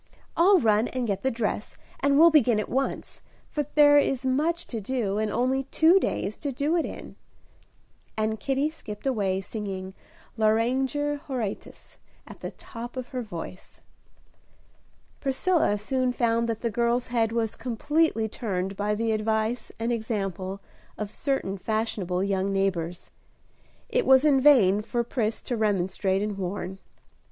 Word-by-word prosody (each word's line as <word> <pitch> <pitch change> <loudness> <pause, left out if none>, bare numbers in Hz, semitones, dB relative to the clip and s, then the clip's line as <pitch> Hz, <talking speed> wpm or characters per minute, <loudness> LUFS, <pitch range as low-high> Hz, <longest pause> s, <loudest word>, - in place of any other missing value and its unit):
I'll 375 +4 +6
run 220 -2 +3
and 255 -1 -2
get 200 -3 -2
the 265 - +1
dress, 220 -3 -3 0.2
and 280 0 +3
we'll 335 +2 +8
begin 245 -8 +4
at 215 - -3
once, 270 +2 -2 0.3
for 295 -2 -2
there 290 -1 +7
is 270 -2 0
much 310 +7 0
to 225 -3 -5
do, 210 -3 -1
and 215 0 0
only 260 +4 0
two 325 +7 +5
days 215 - -2
to 285 - -3
do 285 +6 0
it 335 - +1
in." - - -9 1.0
And 220 0 -1
Kitty 275 +3 0
skipped 210 -8 -9
away, 200 -7 0
singing 190 -2 -6 0.4
"Lauriger 260 +7 +1
Horatius," 240 -7 -5 0.3
at - - -12
the - - -5
top 240 +2 -9
of 255 -1 -5
her 255 -2 -3
voice. 185 -4 -8 1.4
Priscilla 275 - +1
soon 255 +4 0
found 235 -1 +1
that 225 -1 -3
the 235 - -1
girl's 235 +2 +1
head 225 -2 +2
was 225 -2 -1
completely 255 0 0
turned 195 -3 -3
by 205 +1 0
the 225 +1 0
advice 220 +2 -1
and 230 +2 -1
example 195 -4 -3 0.4
of 210 -1 -4
certain 215 -8 -2
fashionable 200 -4 -1
young 195 0 0
neighbors. 180 -3 -2 0.8
It - - 0
was 265 +2 +6
in 275 -3 +4
vain 215 -9 +6
for 235 +2 -1
Pris 230 -2 -2
to 245 - -2
remonstrate 195 -2 0
and 210 -2 -3
warn. 190 0 -4
230 Hz, 150 wpm, -26 LUFS, 205-265 Hz, 1.4 s, we'll